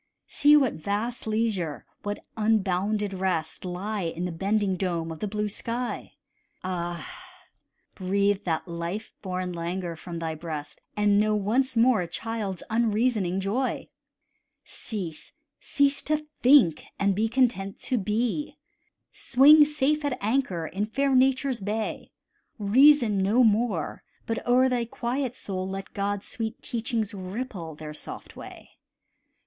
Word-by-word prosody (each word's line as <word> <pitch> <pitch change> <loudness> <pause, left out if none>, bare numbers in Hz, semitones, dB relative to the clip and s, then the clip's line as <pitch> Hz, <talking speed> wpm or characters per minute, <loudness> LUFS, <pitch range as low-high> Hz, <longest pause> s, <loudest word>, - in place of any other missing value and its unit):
See 295 +1 +5
what 270 -5 +2
vast 210 +8 -3
leisure, 215 -8 -1 0.2
what 205 0 -5
unbounded 210 -1 +1
rest, 185 -4 -2
Lie 195 +4 -3
in 170 0 -3
the 180 - -2
bending 195 +3 0
dome 170 -3 -2
of 160 - -7
the 210 - -2
blue 210 +1 -2
sky: 235 +4 -4 0.5
Ah! 175 -3 -3 0.9
breathe 200 +1 +1
that 165 0 -1
life 170 +5 -5
born 185 -2 -3
languor 170 0 -3
from 170 +1 -7
thy 165 -1 -3
breast, 155 -2 -6 0.2
And 205 -1 +4
know 215 0 +2
once 240 +5 +1
more 230 -3 +5
a 175 - -3
child's 205 0 -4
unreasoning 220 -4 +1
joy. 230 +7 -1 0.8
Cease, 185 - -7 0.3
cease 280 0 +1
to 305 0 -1 0.2
think, 245 - +6
and 200 0 +2
be 220 +3 0
content 230 -6 +1
to 255 - 0
be; 230 +8 -1 0.5
Swing 295 +4 +6
safe 300 0 +1
at 285 -3 -1
anchor 210 -7 0
in 200 +6 -2
fair 275 +4 +1
Nature's 260 0 +3
bay; 210 +2 -3 0.5
Reason 240 +2 +5
no 215 +6 +4
more, 215 -6 +1 0.2
but 225 - -2
o'er 255 +2 +5
thy 250 -2 +1
quiet 245 +2 -3
soul 185 -4 -4
Let 195 0 -6
God's 200 0 -2
sweet 225 0 -4
teachings 230 -2 -2
ripple 190 -4 -5
their 150 0 -8
soft - - -8
way. - - -11
210 Hz, 135 wpm, -26 LUFS, 185-240 Hz, 0.9 s, think